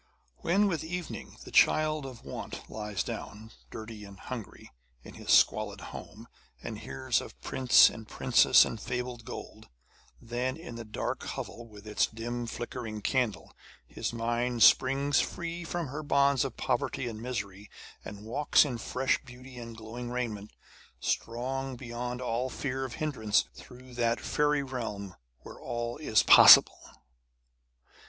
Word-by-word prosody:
When 195 +5 +2
with 170 -7 -1
evening 175 +1 -6
the - - -11
child 155 -2 +3
of 125 -3 -11
want - - -7
lies 105 -4 -3
down, 110 +2 -7 0.2
dirty 110 -1 -8
and 100 -2 -12
hungry, - - -8 0.3
in - - -12
his - - -11
squalid - - +4
home, - - -10 0.4
and - - -6
hears 65 0 -1
of - - -11
prince 130 -2 +5
and 110 -1 -6
princess - - +5
and 110 - -6
fabled 125 -1 -4
gold, - - -9 0.5
then 125 +3 -3
in 165 -7 -9
the 115 0 -7
dark 110 -1 -4
hovel 120 0 -6
with 105 -1 -14
its 105 -1 +1
dim 120 +1 -5
flickering 115 -3 -6
candle, 125 -5 -1 0.3
his - - -4
mind 120 0 0
springs 135 +4 +5
free 170 0 -3
from 170 -3 -4
her 150 +4 -5
bonds 140 -2 +3
of - - -5
poverty 125 - -1
and 110 -2 -6
misery, 100 -5 -5 0.3
and 105 0 -9
walks 145 +7 +3
in 125 -5 -4
fresh 130 +3 0
beauty 125 0 -12
and 115 -1 -9
glowing 115 +2 -7
raiment, 115 -4 -4 0.5
strong 130 +3 -2
beyond 120 0 -5
all 125 +2 -1
fear 135 0 -3
of 125 - -7
hindrance, 110 -9 +1
through 125 0 -14
that 120 -1 0
fairy 150 -1 +1
realm 110 -7 -5 0.3
where - - -12
all 120 0 -4
is 145 -8 +2
possible. - - +9
120 Hz, 145 wpm, -29 LUFS, 110-135 Hz, 0.5 s, possible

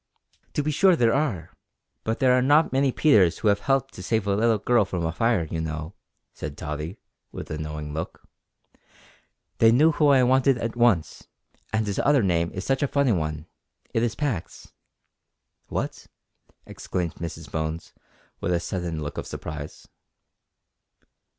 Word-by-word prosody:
"To 145 - 0
be 155 - 0
sure 185 +5 +4
there 115 -6 +3
are, 120 - -1 0.5
but 110 +1 -1
there 130 -1 +4
are 130 - +3
not 145 +4 +4
many 135 0 +2
Peters 100 - +4
who 105 - +1
have 100 0 +2
helped 135 +2 0
to - - -9
save 110 +2 0
a 100 -1 +1
little 115 +1 +3
girl 120 +2 +3
from 90 -3 -3
a 80 - 0
fire, 115 +1 +1
you 80 +1 -4
know," 80 +2 -5 0.4
said 75 -1 -7
Tottie, 75 +4 -5 0.3
with - - -8
a 75 - -4
knowing 75 -1 -5
look. 80 +3 -6 1.3
"They 115 0 +6
knew 150 +7 +5
who 150 -1 +2
I 135 -3 +5
wanted 130 +1 +3
at 115 -1 -3
once, 120 -9 +1 0.4
and 110 0 0
his 100 -2 -2
other 140 -4 +3
name 85 -3 +1
is 95 - -6
such 135 +1 0
a 145 - +2
funny 140 -2 +2
one; 75 -4 -2 0.5
it 115 - +1
is 115 -2 0
Pax 130 - -4 0.5
" - - -56
"What?" - - -4 0.6
exclaimed 90 -3 -4
Mrs 85 -1 -7
Bones, 80 +1 -4 0.5
with 90 - -1
a 85 - +2
sudden 85 -4 -4
look 75 - -5
of - - -6
surprise. 75 -1 -7
105 Hz, 170 wpm, -25 LUFS, 80-130 Hz, 1.3 s, They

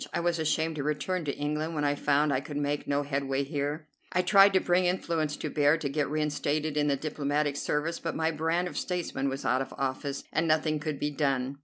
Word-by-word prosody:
I - - -1
was 170 -1 0
ashamed 160 0 0
to 145 - -2
return 155 +4 -1
to 140 - -3
England 150 +2 -2
when 150 - -1
I 145 0 +2
found 145 0 +2
I 130 - +2
could 145 0 -6
make 145 0 -1
no 145 0 +1
headway 140 -1 -1
here. 145 +2 -3 0.3
I 180 - +2
tried 195 +2 +7
to 190 - +5
bring 180 0 +2
influence 165 -4 0
to - - -4
bear 145 +1 +3
to 150 -3 -3
get 140 0 -1
reinstated 150 0 -1
in 150 -1 +2
the 140 - +3
diplomatic 145 0 -1
service, 150 +3 -1
but 165 - -3
my 160 0 +1
brand 165 +3 0
of - - -7
statesman 170 -6 -2
was 135 +1 -5
out 130 +1 +2
of 135 - -5
office 135 +1 -2
and 165 +1 +1
nothing 155 -1 +2
could 155 -1 -3
be 150 0 -1
done. 135 -2 -1
150 Hz, 225 wpm, -29 LUFS, 145-160 Hz, 0.3 s, tried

